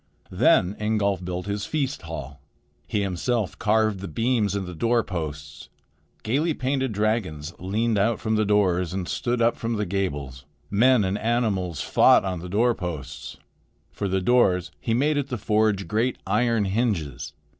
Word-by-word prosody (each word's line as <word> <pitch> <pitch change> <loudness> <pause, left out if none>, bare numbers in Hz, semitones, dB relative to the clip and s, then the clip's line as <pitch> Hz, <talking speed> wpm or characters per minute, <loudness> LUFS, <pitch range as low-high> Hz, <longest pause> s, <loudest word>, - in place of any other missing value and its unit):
" - - -29
Then 95 +3 +4
Ingolf 105 -3 0
built 90 0 -4
his 100 0 -3
feast 145 -3 -2
hall. 70 -4 -8 0.5
He 105 - 0
himself 100 +3 -2
carved 110 -2 +2
the 100 - -6
beams 110 +2 0
and 100 -1 -2
the 90 - -7
door 115 +6 +1
posts. 75 -6 -6 0.5
Gaily 145 +8 0
painted 130 -1 -1
dragons 100 -8 -1
leaned 105 +4 0
out 110 +3 +1
from 110 -1 -1
the 110 - +2
doors 95 -4 +2
and 95 -2 -3
stood 120 -1 -1
up 115 - +3
from 115 0 -3
the 105 -1 -1
gables. 75 -9 -3 0.3
Men 120 +2 +4
and 95 +2 -1
animals 105 - 0
fought - - +5
on 90 -2 -2
the 90 +2 -8
door 115 +6 +3
posts. 75 -7 -6 0.5
For 100 - -3
the 95 0 0
doors 90 -6 +3
he 115 - -1
made 145 +4 +2
at 140 - -2
the 125 - -3
forge 105 -3 +1
great 115 +6 0
iron 115 -4 +1
hinges. 80 - -2
100 Hz, 165 wpm, -24 LUFS, 90-115 Hz, 0.5 s, fought